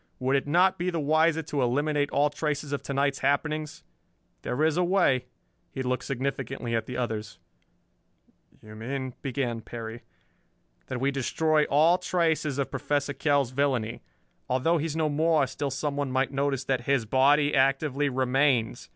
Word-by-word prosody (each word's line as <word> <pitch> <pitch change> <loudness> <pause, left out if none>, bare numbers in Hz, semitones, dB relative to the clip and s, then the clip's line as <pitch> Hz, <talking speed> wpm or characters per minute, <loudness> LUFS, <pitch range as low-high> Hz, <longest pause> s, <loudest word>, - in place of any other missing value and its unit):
Would 130 +1 0
it 140 - 0
not 180 +5 +3
be 180 +1 0
the 170 -2 -2
wiser 160 +2 +2
to 145 -2 -2
eliminate 145 +3 +1
all 145 +1 +2
traces 150 -1 -3
of 145 - -2
to - - -6
night's 140 0 +1
happenings? 150 +2 -1 0.6
There 140 +5 -1
is 160 -1 +3
a 180 - +2
way." 175 -9 +2 0.4
He 130 - -5
looked 125 0 -2
significantly 135 -2 -3
at 110 -1 -2
the 125 - -5
others. 110 -3 -3 1.3
"You 110 0 -12
mean 130 +4 -5
" - - -42
began 125 -3 -2
Perry. 115 +1 -7 0.9
"That - - -4
we 135 +2 +1
destroy 150 +3 +1
all 160 +5 +4
traces 165 -5 0
of 140 - -2
Professor 145 +1 -1
Kell's 140 -4 +1
villainy. 130 -4 -1 0.5
Although 145 +7 +2
he 155 - -1
is 155 - -5
no 160 -1 +1
more, 155 0 +2
still 140 +2 -4
someone 140 0 -2
might 130 0 0
notice 140 -1 -1
that 130 -2 -2
his 135 -4 +2
body 145 +5 +3
actively 135 +1 +2
remains. 130 -2 +1
140 Hz, 165 wpm, -27 LUFS, 130-150 Hz, 1.3 s, all